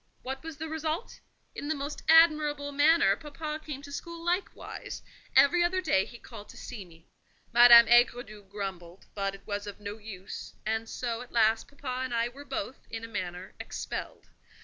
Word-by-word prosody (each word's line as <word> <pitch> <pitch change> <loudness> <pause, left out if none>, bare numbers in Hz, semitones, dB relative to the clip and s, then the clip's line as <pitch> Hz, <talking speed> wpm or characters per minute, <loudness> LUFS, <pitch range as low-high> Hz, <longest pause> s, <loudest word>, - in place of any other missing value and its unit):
What 265 +1 -5
was 325 -2 -8
the 320 0 -5
result? 320 +5 -3 0.3
In 290 - -6
the 315 - 0
most 285 +1 -5
admirable 305 -3 +5
manner, 315 +4 +4
papa 305 0 -6
came 280 -2 -7
to 285 - -10
school 335 +3 -7
likewise: 355 +3 -3 0.3
every 345 +5 +6
other 365 +2 +1
day 190 - +2
he 240 - -11
called 220 -3 -12
to - - -12
see 220 -5 -7
me. 165 -2 -18 0.5
Madame 235 0 +10
Aigredoux 240 -3 +3
grumbled, 190 -3 -6
but 195 -1 -2
it 195 - -17
was 205 -1 -4
of 205 - -8
no 205 +1 -7
use; 200 -3 -8
and 220 +1 -1
so, 235 -2 -3
at 250 - -11
last, 220 -1 +3
papa 260 -3 -5
and 255 -2 -3
I 230 +1 +1
were 280 +4 -12
both, 295 -3 -5
in 225 0 -6
a - - -5
manner, 185 -4 -5
expelled. - - -6
245 Hz, 180 wpm, -29 LUFS, 210-300 Hz, 0.5 s, Madame